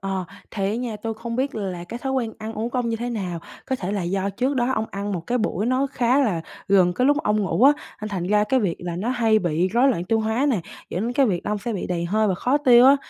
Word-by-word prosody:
Ờ, 195 -1 -2 0.3
thì 195 -3 -2
á - - -1
nha, 235 -3 -3
tui 225 +1 -4
không 230 +1 -5
biết 270 +2 -1
là 185 -5 -4
cái 230 +7 -7
thói 265 +2 -3
quen 235 -4 -1
ăn 220 0 -5
uống 225 +2 -3
của 250 - -1
ông 240 - 0
như 230 - -1
thế 240 +2 -3
nào? 185 -7 -3 0.3
Có 265 - -1
thể 195 -4 -3
là 200 - -1
do 190 +3 -1
trước 255 +7 -1
đó 245 0 +1
ông 220 -1 -1
ăn 200 +1 -3
một 180 - -2
cái 250 +1 0
buổi 215 -2 -1
nó 255 +2 +2
khá 250 +2 +2
là 205 -11 +1 0.3
gần 185 -2 +5
cái 250 +7 +1
lúc 290 +2 +3
ông 210 0 +1
ngủ 205 +4 0
á, 280 - +8 0.3
nên 215 - -3
thành 185 -4 -3
ra 210 +1 +3
cái 260 +5 +2
việc 190 -6 0
là 175 -1 -5
nó 200 +7 -2
hay 230 -3 +3
bị 175 -1 0
rối 240 +7 +3
loạn 180 -10 0
tiêu 225 +4 +1
hóa 220 +6 +1
nè, 220 -8 +1 0.3
dẫn 175 - -2
đến 235 +2 -1
cái 270 0 +3
việc 180 -5 0
là - - -2
ông 210 - 0
sẽ 235 +3 -4
bị 200 - -3
đầy 170 -1 -2
hơi 215 +5 +1
và 190 - +1
khó 255 +10 +1
tiêu 250 -4 +7
á, 275 +1 +7
220 Hz, 300 wpm, -23 LUFS, 195-245 Hz, 0.3 s, á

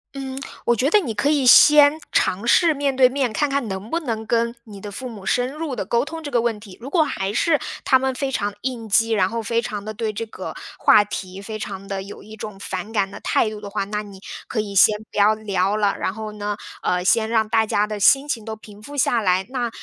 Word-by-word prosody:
嗯， 265 -1 -5 0.3
我 240 - +3
觉 255 +5 +1
得 425 - +5
你 250 - -4
可 220 +8 0
以 290 -3 +2
先 295 +4 +7
尝 200 +6 +1
试 330 +5 +5
面 280 -1 -1
对 260 -1 +6
面， 255 -2 -1
看 295 +7 0
看 275 -4 -1
能 190 +3 -6
不 335 - +1
能 225 -7 -4
跟 235 +1 0
你 205 -4 -12
的 205 - -7
父 255 +6 -6
母 215 -5 -10
深 245 +5 0
入 305 -3 -4
地 200 - -3
沟 235 +3 +1
通 320 +2 -7
这 290 - -6
个 240 - +2
问 230 -2 -1
题， 205 -2 -13
如 265 - -7
果 325 +1 +3
还 195 -9 -3
是 305 +6 +2 0.3
他 260 - +5
们 265 0 -1
非 275 0 -2
常 205 -5 -1
地 - - -20
应 240 -4 -4
激， 225 +3 +3
然 190 -4 +2
后 230 -1 -3
非 230 +2 0
常 210 -2 -5
地 215 - -5
对 220 0 -2
这 230 +2 -5
个 220 - -8 0.2
话 210 - +6
题 190 -2 -6
非 215 +1 -6
常 195 -1 -7
地 195 -1 -3
有 195 +1 -10
一 215 +1 -11
种 210 -2 -8
反 195 +2 -5
感 200 -3 0
的 - - -9
态 215 - +1
度 215 -1 -8
的 205 - -7
话， 200 - -2
那 210 +1 -3
你 200 -2 -12 0.3
可 230 - -3
以 205 -2 -3
先 210 +2 +5
不 - - -9
要 210 +2 +5
聊 200 -1 -1
了， 205 -2 +1
然 - - -2
后 215 0 -7
呢， 205 -1 -4 0.2
呃， 180 0 0
先 220 +2 +3
让 220 -2 +2
大 220 0 +2
家 210 0 +1
的 210 -1 -5
心 270 +7 +5
情 230 -7 -2
都 220 0 -6
平 210 -1 -15
复 285 +6 -9
下 240 -3 +2
来， 185 -1 +1
那 245 -3 -2
220 Hz, 280 characters per minute, -22 LUFS, 205-260 Hz, 0.3 s, 先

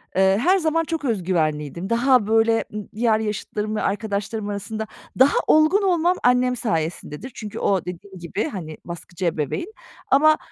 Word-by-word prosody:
eee, 190 +1 +4
her 370 +8 +4
zaman 330 -2 +1
çok 325 -2 -3
öz 220 -8 0
güvenliydim. 160 -1 -1
Daha, 240 -1 +3
böyle, 225 +1 +3
ımm, 210 -1 -6
diğer 220 -1 +2
yaşıtlarım 210 0 -3
ve - - -1
arkadaşlarım 205 0 -2
arasında 210 +2 -4 0.3
daha 265 +2 +5
olgun 310 +7 +5
olmam 355 -1 +2
annem 250 0 +3
sayesindedir. 165 - -3
Çünkü 210 -2 -6
o 190 -4 +1
dediğim 185 +2 -8
gibi, 175 +5 -3
hani, 160 - -7
baskıcı 175 +1 -6
ebeveyn 165 - -2 0.4
ama 310 +3 +6
215 Hz, 155 wpm, -22 LUFS, 185-260 Hz, 0.4 s, ama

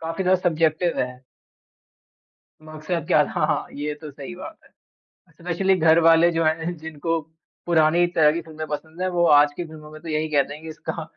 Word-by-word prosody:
काफ़ी 165 +3 -3
ज़्यादा 185 0 +2
सब्जेक्टिव 165 +1 0
है। 125 +1 -5 1.4
मकसद 155 +1 -5
क्या - - +4
था? - - -2
हाँ, - - -1
ये 150 +1 -4
तो 155 -2 -8
सही 145 +5 -9
बात 320 - -10
है। - - -21 0.7
स्पेशली 180 +3 +1
घर 160 +1 +5
वाले 165 +1 +5
जो 165 0 0
हैं, 160 +2 -1
जिनको 160 +1 -3 0.5
पुरानी 170 0 +3
तरह 150 -2 +5
की 170 - -3
फिल्में 155 -1 -8
पसंद 160 +3 -6
हैं 185 - 0
वो 175 -1 +1
आज 145 0 +5
कि 175 - -3
फिल्मों 155 -1 -12
में 155 0 -12
तो 170 - -11
यही 155 0 -1
कहते 145 -1 +1
है 150 - -13
कि 160 - -10
इसका 160 +1 -6
160 Hz, 195 wpm, -23 LUFS, 155-170 Hz, 1.4 s, घर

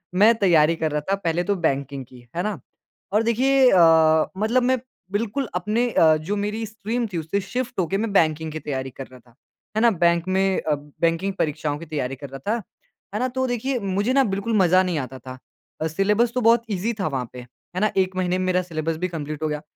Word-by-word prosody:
मैं 210 +5 +6
तैयारी 165 -3 +4
कर 160 -2 -1
रहा 150 - -1
था - - +4
पहले 175 -3 -1
तो 200 +2 0
बैंकिंग 135 -1 -3
की, 120 -1 -16
है 175 - -1
ना? 210 -7 -3 0.5
और 215 +3 +2
देखिए 260 +3 +4
अ, 160 -3 +5
मतलब 230 +5 +2
मैं 255 0 +2 0.3
बिल्कुल 230 +6 -1
अपने 215 +7 0
अ, 160 -4 +5
जो 165 +7 -3
मेरी 210 +2 -2
स्ट्रीम 225 +2 -3
थी - - -1
उससे 165 +5 -2
शिफ़्ट 240 +4 -4
होके 185 +2 0
मैं 220 +1 -2
बैंकिंग 160 -3 +2
की 155 - -5
तैयारी 135 -2 -4
कर 135 +1 -9
रहा 130 0 -15
था। 120 0 -25 0.4
है - - +3
ना? 235 -1 +5
बैंक 170 -1 +2
में 190 0 +1
अ, 150 - 0
बैंकिंग 165 +6 -2
परीक्षाओं 150 -1 -1
की 170 - -8
तैयारी 140 -4 -3
कर 140 +1 -9
रहा 135 +1 -8
था। 230 +1 -1 0.5
है 210 - -1
ना? 255 - +1
तो 260 +1 -2
देखिए 250 +2 -1
मुझे 200 +4 0
ना 275 -1 +5
बिल्कुल 200 +4 -2
मज़ा 185 -1 +5
नहीं 180 -3 -1
आता 130 0 -6
था। 130 +1 -9 0.4
अ, 160 - +1
सिलेबस 210 +8 +1
तो 250 - +1
बहुत 230 +1 +4
ईज़ी 205 +4 -1
था 190 - 0
वहाँ 130 -5 -3
पे, 125 - -8
है 125 +8 -10
ना? 215 - +2
एक 190 0 +1
महीने 185 -1 0
में 185 - -1
मेरा 185 0 +2
सिलेबस 165 -2 -3
भी - - +2
कंप्लीट 155 -3 -5
हो - - +1
गया। 150 -1 -3
180 Hz, 230 wpm, -23 LUFS, 155-215 Hz, 0.5 s, मैं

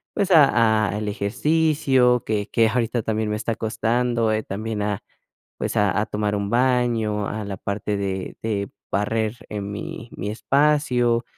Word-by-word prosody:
pues 200 -2 0
a 115 -8 +5
a 105 - -3
el 105 0 -3
ejercicio 130 +2 +2
que 105 -1 -1
que 115 -1 +3
ahorita 115 0 0
también 110 -1 -1
me 105 - -1
está 115 0 -2
costando, 115 +1 0
eh, 110 0 0
también 105 +1 -4
a, 105 -1 -2 0.6
pues - - -3
a 105 -1 +2
a 110 - -1
tomar 105 0 -1
un 100 0 -2
baño, 120 -4 +1
a 110 0 -4
la 100 -1 -5
parte 100 +1 -3
de 95 -1 -3
de 100 -3 -2 0.2
barrer 110 +2 0
en 100 -1 -5
mi 110 +3 -7
mi 100 +3 -3
espacio, 125 -2 +2
110 Hz, 165 wpm, -23 LUFS, 105-120 Hz, 0.6 s, a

